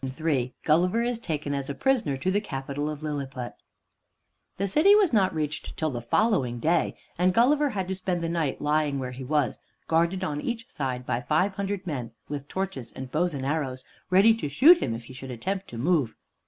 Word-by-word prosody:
III 140 -6 0
GULLIVER 180 +9 +3
IS 240 -1 -1
TAKEN 150 -8 -3
AS 140 -1 -3
A 140 - -3
PRISONER 220 - +1
TO 185 +8 0
THE 205 +2 +1
CAPITAL 140 -3 -4
OF 150 0 -6
LILLIPUT 135 -5 -4 1.0
The 195 - 0
city 315 - +6
was 400 - +4
not 195 -4 +4
reached 155 -1 -4
till 155 -1 0
the 120 -2 -4
following 130 - +1
day, 165 +7 +1 0.2
and 180 0 +3
Gulliver 285 +5 +4
had 190 -6 -3
to 190 - -1
spend 185 -2 -2
the - - 0
night 165 -5 -1
lying 150 -1 +1
where 130 -1 -4
he 130 +1 -7
was, 145 0 0 0.3
guarded 170 +3 +1
on 150 -5 -2
each 230 -1 -4
side 130 -3 -3
by 120 - -1
five 155 +10 +1
hundred 200 -1 -3
men 125 -9 -4
with 145 -1 -5
torches 185 -10 -4
and 130 -1 -7
bows 175 0 0
and 135 -1 -4
arrows, 135 -3 -2 0.2
ready 195 +5 +6
to 150 - -3
shoot 315 - +7
him 115 - -1
if 115 - -7
he 130 - -12
should 130 +1 -9
attempt 190 - -3
to 120 - -8
move. 140 -3 +1
155 Hz, 205 wpm, -27 LUFS, 135-190 Hz, 1.0 s, shoot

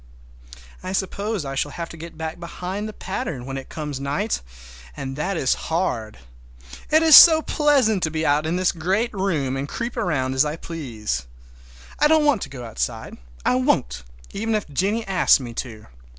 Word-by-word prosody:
I 185 +1 -5
suppose 200 -1 -2
I 135 - -4
shall 135 +2 -1
have 170 +3 -6
to - - -10
get 165 0 -10
back 160 +1 -5
behind 185 +5 -5
the - - -6
pattern 165 -10 -5
when 135 0 -5
it 135 -1 -7
comes 150 -4 -5
night, 145 +11 -2 0.6
and 135 0 -5
that 180 +6 -2
is 130 - +2 0.2
hard! 140 - -1 0.7
It 315 +1 +4
is 320 -2 +9
so 320 -2 +10
pleasant 270 -10 +2
to 160 - +1
be 160 0 -2
out 150 +2 +2
in 165 - 0
this 185 0 +2
great 190 +8 -1
room 165 -10 -1
and 135 +1 -4
creep 235 +1 -4
around 150 - -1
as 130 +1 +4
I 150 0 -2
please! 115 - -5 0.7
I 300 - +5
don't 310 0 +4
want 280 -9 +3
to - - -5
go 125 -3 -8
outside. 115 0 -4 0.3
I - - +3
won't, 65 - 0 0.3
even 225 +2 -1
if 210 - -2
Jennie 200 +10 -1
asks 185 -5 +4
me 120 -3 -7
to. 115 -3 -6
165 Hz, 185 wpm, -22 LUFS, 135-205 Hz, 0.7 s, so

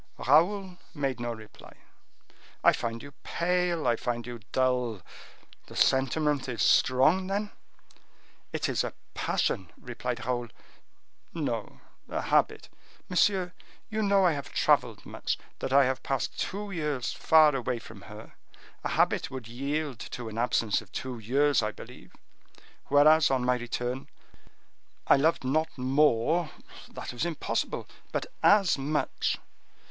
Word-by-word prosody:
Raoul 180 +6 +2 0.2
made 135 -4 -2
no 120 0 -2
reply. 110 -2 -12 0.9
"I - - +7
find 115 0 -4
you 140 - -10
pale; 175 -2 0
I 120 -1 +3
find 120 0 -3
you 120 -1 -7
dull. 125 -6 0 0.6
The - - -12
sentiment 135 +1 +2
is 115 - -1
strong, 155 +9 +4
then?" 205 +2 -2 1.0
"It - - -1
is - - 0
a - - -5 0.2
passion," 95 -2 -1
replied 125 0 -5
Raoul. 120 -1 -1 0.9
"No—a - - -5
habit." - - +1 0.4
"Monsieur, 185 0 +2 0.4
you 220 0 -1
know 200 -2 +4
I 175 - +5
have 140 -3 -5
traveled - - +2
much, - - -3 0.2
that - - -3
I 140 0 +6
have 130 0 -1
passed 135 -3 -2
two 205 +1 -4
years 150 -8 -2
far 155 -2 +5
away 125 -1 -1
from 110 -3 -12
her. 105 +1 -11 0.5
A - - -1
habit - - +1
would 130 -4 -7
yield 140 +2 -3
to 120 -2 -6
an 110 - -8
absence 115 -3 +1
of 105 -3 -17
two 125 +2 -5
years, 140 +5 +2
I 110 0 -1
believe; - - -13 0.8
whereas, 150 +3 +6
on 130 -2 +1
my 125 - +4
return, 125 +2 -4 1.0
I - - +6
loved 155 +2 +2
not 155 +5 +1
more, 145 +4 +2 0.4
that - - -7
was 120 - -3
impossible, 170 -2 -2 0.2
but - - -1 0.2
as 195 -7 +5
much. 150 +3 -1
135 Hz, 135 wpm, -28 LUFS, 120-160 Hz, 1.0 s, I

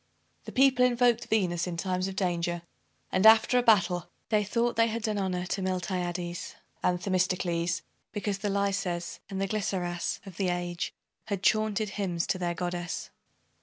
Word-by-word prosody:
The - - -7
people 265 -1 +4
invoked 240 -1 +3
Venus 180 -5 +1
in 175 -2 -4
times 185 +1 -1
of 195 - -5
danger; 175 -2 -1 0.5
and, 185 - +2
after 220 +3 +7
a - - +3
battle, 195 -7 +3 0.2
they 215 -1 +3
thought 235 +4 0
they 230 0 +4
had 230 0 -3
done 215 -2 0
honor 185 -2 -1
to 195 +2 -2
Miltiades 180 -2 -3 0.3
and 180 0 +1
Themistocles, 180 -2 0 0.3
because 205 -1 -2
the 205 0 -1
Laises 195 -3 -1
and 195 -2 -4
the 195 - 0
Glyceras 185 -4 -2
of 190 -3 -10
the 190 -2 +1
age 175 -1 -2 0.3
had 200 -2 -3
chaunted 215 -1 +2
hymns 185 -4 -2
to 185 - -1
their 175 -1 -1
Goddess. 175 0 -3
190 Hz, 165 wpm, -29 LUFS, 175-210 Hz, 0.5 s, after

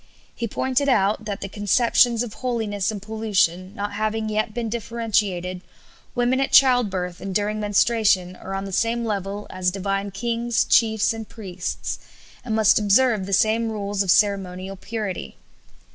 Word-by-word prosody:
He 235 - -3
pointed 260 +5 0
out 210 -2 +2
that 205 -2 -4
the 195 - -4
conceptions 230 +4 +2
of 230 -3 -7
holiness 220 -6 -2
and 215 -2 -3
pollution 200 -4 0
not 205 -1 -4
having 215 +1 -1
yet 215 +1 -1
been 235 +1 -3
differentiated, 210 -5 -1 0.5
women 245 +1 +2
at 270 - -1
childbirth 200 -10 +3
and 195 -1 -5
during 210 +1 0
menstruation 205 -3 +2
are 195 +1 -7
on 195 0 -3
the 195 - -6
same 230 +4 0
level 200 -1 -3
as 185 -1 0
divine 195 +1 -2
kings, 235 +3 0
chiefs, 220 -1 +3
and 225 -1 -8
priests, 190 -6 -5 0.4
and 230 -3 -2
must 220 -1 +5
observe 210 -1 +3
the - - -6
same 220 +3 +2
rules 205 -1 -2
of 195 - -1
ceremonial 195 -1 +1
purity. 195 - -5
210 Hz, 155 wpm, -23 LUFS, 195-230 Hz, 0.5 s, must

